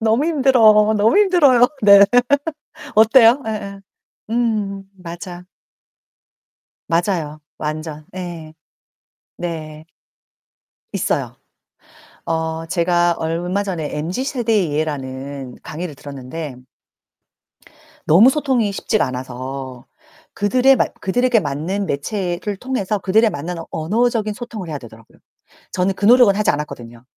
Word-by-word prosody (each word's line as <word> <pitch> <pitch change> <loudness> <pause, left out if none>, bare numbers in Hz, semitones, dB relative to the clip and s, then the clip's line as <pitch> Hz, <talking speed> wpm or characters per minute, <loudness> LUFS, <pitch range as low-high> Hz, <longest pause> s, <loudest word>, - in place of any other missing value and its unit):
너무 225 +5 +2
힘들어. 230 -8 +4
너무 210 +2 +3
힘들어요. 300 - +5 0.2
네. 200 -1 +8 0.9
어때요? 230 +4 +6
예예. 200 -2 -5 0.5
음 215 -4 -1
맞아. 175 0 -9 1.4
맞아요, 165 -3 -1 0.2
완전. 155 0 -5
예. 170 -4 -7 0.9
네. 155 -3 -6 1.1
있어요. - - -2 0.9
어 160 0 -2
제가 175 0 +1
얼마 175 +5 -2
전에 170 -7 -4
MZ 175 - -3
세대의 225 - 0
예라는 135 -3 -4
강의를 160 0 -6
들었는데 140 +1 -8 1.5
너무 195 +11 +7
소통이 260 -8 0
쉽지가 210 0 0
않아서 130 0 -7 0.5
그들에 255 +6 +3
맞 - - 0
그들에게 245 +5 +2
맞는 165 +7 -3
매체를 180 +5 -3
통해서 215 -3 -2
그들에 215 +4 +3
맞는 175 +1 -5
언어적인 215 +5 0
소통을 220 -6 -7
해야 150 -2 -4
되더라고요. 115 -3 -16 0.5
저는 185 +1 0
그 200 - -2
노력은 235 -3 +6
하지 210 +1 +1
않았거든요. 120 -5 -7
180 Hz, 245 characters per minute, -19 LUFS, 155-220 Hz, 1.5 s, 네